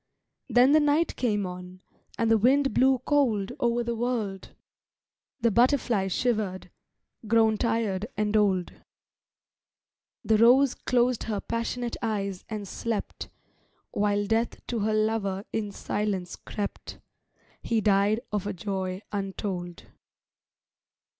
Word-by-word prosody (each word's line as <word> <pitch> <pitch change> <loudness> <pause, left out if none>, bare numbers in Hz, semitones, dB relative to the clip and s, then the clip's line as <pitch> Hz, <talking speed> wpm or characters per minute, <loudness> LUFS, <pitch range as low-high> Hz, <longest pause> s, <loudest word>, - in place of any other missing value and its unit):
Then 245 +3 +5
the 310 - +6
Night 300 +2 +2
came 210 -5 0
on, 180 0 -8 0.4
and 225 -1 +1
the 225 - +6
wind 270 +3 +3
blew 260 +3 +4
cold 240 -9 +1
O'er 240 0 +1
the 235 0 -2
wold. 225 -5 -3 0.9
The 230 0 +3
butterfly 235 -4 +2
shivered, 195 -4 -1 0.6
grown 220 0 +4
tired 220 -4 0
and 210 0 0
old; 195 -4 +2 1.5
The 220 -1 +3
rose 250 +3 +6
closed 245 -1 0
her 215 -3 -2
passionate 230 +2 -3
eyes 200 -4 -2
and 210 -2 -5
slept, 225 +2 -4 0.6
While 205 0 +1
death 225 +3 -1
to 235 - -1
her 215 +1 0
lover 215 -2 0
in 210 -2 -2
silence 200 -3 -3
crept; 205 -1 -6 0.6
He 230 -1 0
died 205 +1 +2
of 205 -1 -2
a 205 - -2
joy 190 0 -4
untold. 190 -3 -4
215 Hz, 120 wpm, -27 LUFS, 200-235 Hz, 1.5 s, the